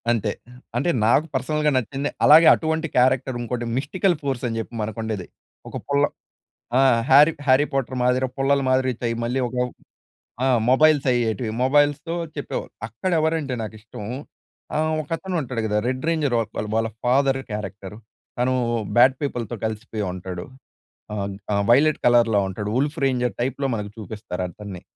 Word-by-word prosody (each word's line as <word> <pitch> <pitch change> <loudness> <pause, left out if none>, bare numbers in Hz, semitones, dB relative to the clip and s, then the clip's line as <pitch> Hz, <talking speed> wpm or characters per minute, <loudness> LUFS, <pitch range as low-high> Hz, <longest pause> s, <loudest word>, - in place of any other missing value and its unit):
అంతే. 110 -3 +1 0.5
అంటే 140 +8 +1 0.2
నాకు 130 +7 +4
పర్సనల్‌గా 150 -1 +1
నచ్చింది, 135 +4 -2 0.2
అలాగే 160 +2 +8
అటువంటి 160 0 -1
క్యారెక్టర్ 130 0 +3
ఇంకోటి 120 0 -3
మిస్టికల్ 175 +6 +1
ఫోర్స్ 135 -4 -3
అని 115 -1 -3
చెప్పి 110 - -6
మనకు 105 +1 -4
ఉండేది. 105 -5 -4 0.4
ఒక - - -5
పుల్ల 140 0 +2 0.8
ఆ! - - +5 0.3
హ్యారీ 145 +4 +7
హ్యారీ 130 +2 +5
పొటర్ 130 -1 -2
మాదిరి, 125 +1 +2
పుల్లలు 140 +1 +2
మాదిరి 130 0 +2
చై 120 - 0
మళ్ళీ 125 +3 -1
ఒక 125 - -8 0.9
ఆ! - - +2 0.2
మొబైల్స్ 150 +1 +4
అయ్యేటివి, 115 -2 0
మొబైల్‌స్‌తో 145 +4 +2 0.2
చెప్పేవాళ్ళు. - - -5
అక్కడ 115 - -4
ఎవరంటే 155 -4 0
నాకు 110 0 -6
ఇష్టం 110 -1 -10 0.7
ఆహ్, 155 +1 +1
ఒకతను 170 +5 -4
ఉంటాడు 125 -4 -3
కదా! 105 -1 -1
రెడ్ 130 0 -2
రేంజర్ 155 -6 +1
వాల్ 110 -1 -3
వాళ్ళ 115 0 +1 0.2
ఫాదర్ 135 +2 +2
క్యారెక్టర్ 100 -1 -6 0.4
తను 125 +1 +1 0.4
బ్యాడ్ 130 +2 +7
పీపుల్‌తో 120 -5 -3
కలిసిపోయి 110 -1 -3
ఉంటాడు. 90 -1 -6 0.7
ఆహ్, 100 -1 -2 0.3
ఆహ్, 100 0 +1
వైలెట్ 150 +5 +4
కలర్‌లో 120 -3 +4
ఉంటాడు 105 +2 -4
వుల్ఫ్ 145 +5 0
రేంజర్ 125 -2 0
టైప్‌లో 135 +2 -1
మనకు 105 -2 -4
చూపిస్తారు 105 -4 -5
అతన్ని. 95 0 -9
125 Hz, 150 wpm, -23 LUFS, 110-140 Hz, 0.9 s, అలాగే